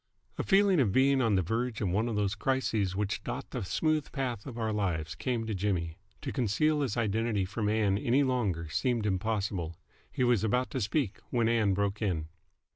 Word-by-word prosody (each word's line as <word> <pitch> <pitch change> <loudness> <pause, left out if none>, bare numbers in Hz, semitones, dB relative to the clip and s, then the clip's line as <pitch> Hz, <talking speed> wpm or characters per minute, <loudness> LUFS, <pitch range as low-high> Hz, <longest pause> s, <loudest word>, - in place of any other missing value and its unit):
A - - +1
feeling 195 -3 +4
of 115 -8 +3
being 135 +3 +4
on 115 -4 +3
the 95 - +2
verge 115 +5 -2
of 100 - 0
one 105 +6 +1
of 115 - -2
those 100 -1 +1
crises 110 -5 0
which 100 0 -2
dot - - -5
the - - -3
smooth 155 - 0
path 125 -6 -3
of 120 -3 -7
our 110 -2 -1
lives 85 -7 -1
came 120 -3 -2
to 110 - -2
Jimmy. 90 -4 -1 0.2
To - - -3
conceal 145 +5 +1
his 130 -7 -1
identity 110 -2 0
from 105 +2 -2
Ann 105 -2 +2
any 125 +6 +3
longer 105 - 0
seemed 120 - 0
impossible. 95 -4 -1 0.3
He - - -1
was 120 -4 +3
about 125 +4 +1
to - - -2
speak, 110 0 -1
when 120 -2 +1
Ann 110 -4 +2
broke 100 +1 -1
in. 85 -7 -1
110 Hz, 200 wpm, -30 LUFS, 100-125 Hz, 0.3 s, feeling